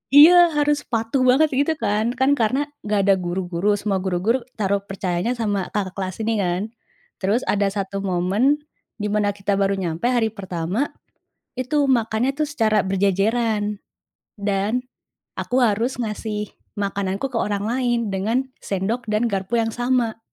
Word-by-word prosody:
iya, 340 +2 +8
harus 295 0 +1
patuh 230 +2 0
banget 290 +5 +4
gitu 285 +4 +1
kan, 215 +4 +1
kan 265 +2 +3
karena 270 +7 +1 0.2
nggak 210 -1 +1
ada 200 - +7
guru-guru, 180 +2 0
semua 200 -1 -1
guru-guru 190 +7 0 0.2
taruh 200 -2 +1
percayanya 195 +4 -2
sama 205 -5 -1
kakak 195 -3 -1
kelas 185 -2 -3
ini 225 -1 0
kan. 180 -1 0 0.6
Terus 205 +6 +1
ada 200 0 +1
satu 195 0 -3
momen 200 +10 +1 0.3
di 210 -1 -3
mana 205 -1 +1
kita 195 0 -1
baru 195 0 +2
nyampe 175 +2 -2
hari 240 -3 +2
pertama, 190 - -3 0.6
itu 275 +3 +1
makannya 240 +1 +1
tuh 305 - +1
secara 220 -8 +1
berjejeran 205 +2 +1 0.6
dan 200 +4 0 0.6
aku 250 +1 +1
harus 230 +3 +1
ngasih 210 -1 -4 0.2
makananku 200 +4 -2
ke 230 - -1
orang 205 -2 -1
lain, 240 -1 0
dengan 215 +7 0 0.2
sendok 215 +5 -2
dan 215 +2 +1
garpu 195 +3 -1
yang 225 - -2
sama, 240 -2 0
210 Hz, 150 wpm, -22 LUFS, 195-245 Hz, 0.6 s, iya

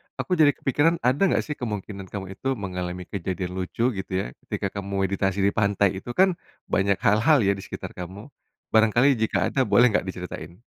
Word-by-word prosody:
aku - - -5
jadi 150 -2 +5
kepikiran 145 +5 +2
ada 125 +6 +1
enggak 190 - +2
sih 150 - -5
kemungkinan 105 -4 -5
kamu 95 0 -6
itu 135 - -5
mengalami 90 -4 -5
kejadian 95 0 -3
lucu 105 +6 0
gitu 95 - -6
ya - - -4 0.2
ketika - - -3
kamu 100 0 -2
meditasi 95 0 0
di 100 - +5
pantai 100 -2 +1
itu 120 +5 -6
kan 185 +1 +3 0.3
banyak 100 0 +2
hal-hal 125 +8 +4
ya 100 - +3
di - - -7
sekitar - - -7
kamu, 95 +8 -8 0.4
barangkali 110 +4 +4
jika 110 0 +1
ada 135 -2 +1
boleh 115 +5 +5
enggak 105 - 0
diceritain? 90 0 -7
100 Hz, 185 wpm, -25 LUFS, 95-125 Hz, 0.4 s, jadi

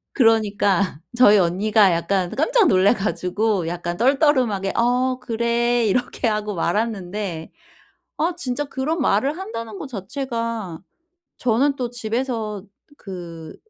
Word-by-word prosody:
그러니까 205 - +2 0.2
저희 210 -4 +7
언니가 195 +3 +3
약간 175 +2 0
깜짝 430 - +3
놀래 190 0 +4
가지고 195 -1 -1
약간 175 0 -4
떨떠름하게 255 - +2
"어 250 +2 +1
그래." 235 -1 0
이렇게 245 +3 0
하고 210 -1 -2
말았는데 190 -2 -2 0.7
아 340 +3 0
진짜 280 -3 -3
그런 280 +4 -3
말을 270 - +1
한다는 230 - -6
거 - - -6
자체가 230 - -4 0.6
저는 255 +4 +2
또 245 -3 -3
집에서 225 -3 -3 0.4
그 170 -5 -9
220 Hz, 255 characters per minute, -22 LUFS, 195-250 Hz, 0.7 s, 저희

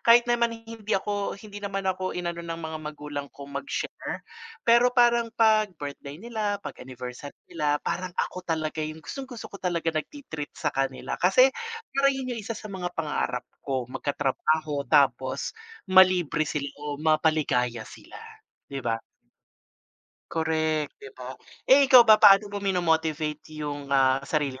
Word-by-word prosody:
kahit 235 +1 +6
naman 235 -1 +1
hindi 225 -2 -9
ako 205 0 -2
hindi 205 0 -10
naman 195 -1 -3
ako 185 -1 -2
i-nano 170 -1 -3
ng 165 -1 -5
mga 160 -1 -5
magulang 145 -1 -6
kong 140 0 -11
mag-share, 285 - -5 0.4
pero 240 +1 +6
parang 240 -2 +4
pag 215 -2 +4
birthday 145 -1 -7
nila, 215 0 -2
pag - - -5
anniversary 125 +2 -8 0.2
nila, 145 -1 +1
parang 185 0 -2
ako 185 - -2
talaga 155 -1 -1
yung 155 0 -5
gustong-gusto 265 -4 -7
ko - - -7
talaga 170 -3 -1
nagti-treat 155 - -6
sa 150 -2 -1
kanila. 135 -1 -2
Kasi, 255 +9 +5 0.4
parang 275 0 +3
yun 255 -2 -3
yung 230 - -4
isa 225 +1 -5
sa 215 - -9
mga 180 -2 -3
pangarap 150 -6 -2 0.2
ko, 130 -3 -2
mag-katrabaho 145 +1 0
tapos 130 -1 +2 0.4
ma-libre 180 -5 +5
sila 140 -2 -2
o 145 -1 -4
mapaligaya 150 -7 +1
sila, - - -13 0.5
'di 140 -1 -5
ba? 115 -2 0 1.3
Korek, 160 -2 0
'di 135 - -9
ba? 130 0 -7 0.3
Eh, 275 +1 +6
ikaw 250 -3 +9
ba 215 -1 +7
paano 200 +1 +7
mo 200 - -3
mino-motivate 160 -5 -1
yung, 145 -1 -5
ah, 135 -1 +3
sarili 140 -4 -1
160 Hz, 150 wpm, -26 LUFS, 145-210 Hz, 1.3 s, ikaw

